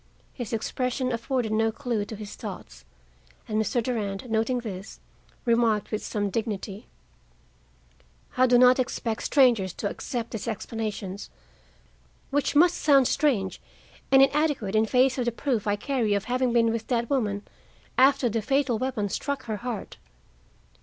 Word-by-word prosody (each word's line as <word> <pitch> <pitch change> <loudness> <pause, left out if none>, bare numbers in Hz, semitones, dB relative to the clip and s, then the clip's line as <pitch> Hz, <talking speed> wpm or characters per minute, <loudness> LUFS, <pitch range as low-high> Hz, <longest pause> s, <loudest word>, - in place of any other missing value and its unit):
His 240 -5 -6
expression 255 +3 -1
afforded 235 -1 -1
no 220 +1 +2
clue 235 -4 -2
to 220 - -7
his 210 -1 -8
thoughts, - - -9 0.6
and 215 0 0
Mr. 235 +2 0
Durand, 215 -3 -3
noting 225 +3 +1
this, 200 -3 -7 0.5
remarked 230 -3 +2
with 215 - -2
some 205 -2 -2
dignity: 210 -2 -4 1.5
"I 255 0 +4
do 245 0 +5
not 250 +1 +6
expect 235 -3 -2
strangers 235 - +3
to 205 - -3
accept 235 +3 -4
these 225 -2 -5
explanations, 215 -3 -4 1.0
which 290 +1 0
must 345 +4 +5
sound 275 -4 +4
strange 245 -11 0 0.5
and 270 0 +8
inadequate 280 -8 +1
in 220 +1 +3
face 260 +2 +3
of 245 - 0
the 240 - +1
proof 235 -3 -2
I 205 - +2
carry 225 -2 0
of 200 - -1
having 250 +1 0
been 230 -1 +3
with 225 -1 -3
that 235 -2 0
woman 210 -7 -1 0.5
after 265 -1 +4
the 225 0 -1
fatal 255 0 +1
weapon 255 -5 -1
struck 275 +6 -3
her 220 -2 -3
heart. 235 -2 -6
230 Hz, 150 wpm, -26 LUFS, 215-255 Hz, 1.5 s, and